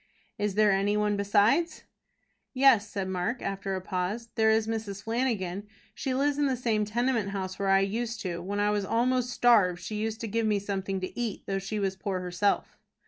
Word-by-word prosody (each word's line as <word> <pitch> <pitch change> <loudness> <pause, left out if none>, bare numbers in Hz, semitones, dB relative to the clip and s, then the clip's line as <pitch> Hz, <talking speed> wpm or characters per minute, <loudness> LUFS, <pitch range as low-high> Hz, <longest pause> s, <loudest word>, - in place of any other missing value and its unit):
"Is 205 -2 -1
there 210 -1 +5
any 200 +2 +2
one 210 0 +1
besides?" 205 +11 +2 0.7
"Yes," 255 -6 +5
said 195 -2 -3
Mark, 190 +6 -2
after 195 0 -3
a 185 - -3
pause; 190 +5 -3
"there 220 -1 +3
is 220 0 +3
Mrs. 215 -3 -4
Flanagan. 215 -5 -1 0.3
She 265 -3 -2
lives 285 +2 +1
in 290 - +3
the 260 -2 0
same 225 -3 0
tenement 235 -1 0
house 190 -1 -4
where 195 -1 0
I 195 0 +5
used 225 +3 -2
to. 175 -2 -3
When 200 +3 -3
I 205 0 +2
was 205 -1 0
almost 245 +4 +1
starved 210 -8 +4
she 185 - -7
used 220 +1 -2
to 230 - -3
give 225 +1 0
me 210 -1 +2
something 195 -1 -3
to 185 - -5
eat, 230 -4 -3
though 195 0 -1
she 195 +3 -4
was 195 -2 -1
poor 190 0 -3
herself." 180 +3 -1
205 Hz, 200 wpm, -28 LUFS, 195-230 Hz, 0.7 s, there